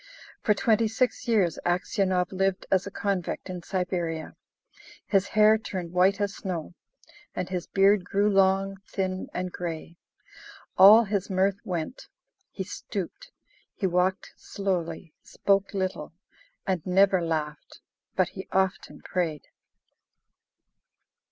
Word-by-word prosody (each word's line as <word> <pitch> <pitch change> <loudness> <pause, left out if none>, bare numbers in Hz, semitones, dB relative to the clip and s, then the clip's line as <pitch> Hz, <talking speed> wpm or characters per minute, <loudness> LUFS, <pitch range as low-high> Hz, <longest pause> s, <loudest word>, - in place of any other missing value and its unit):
For 210 - +3
twenty 225 +1 +2
six 245 +4 -1
years 195 -8 +2
Aksionov 180 0 0
lived 195 0 0
as 190 0 +2
a - - -3
convict 195 -2 -3
in 180 -1 -6
Siberia. 175 -3 -3 0.7
His 195 -1 +2
hair 215 +1 +5
turned 185 -5 -5
white 185 +3 +3
as 200 -1 -1
snow, 175 -5 -5 0.6
and 180 - -2
his 180 -2 -3
beard 195 0 +4
grew 200 +2 +1
long, 195 -1 +2
thin, 185 -1 -3
and 180 0 -3
grey. 170 -1 -6 0.8
All 210 +5 +9
his 200 -2 -2
mirth 195 +1 +1
went; 180 - -4 0.4
he - - -5
stooped; - - -6 0.5
he 205 - -2
walked 185 +1 0
slowly, 175 -4 -3
spoke 195 -1 0
little, 185 -6 -3 0.5
and 185 -5 -1
never 190 0 +4
laughed, 155 -3 -4 0.4
but - - +2
he - - -9
often 190 0 -1
prayed. 165 -5 -3
190 Hz, 120 wpm, -27 LUFS, 180-200 Hz, 0.8 s, All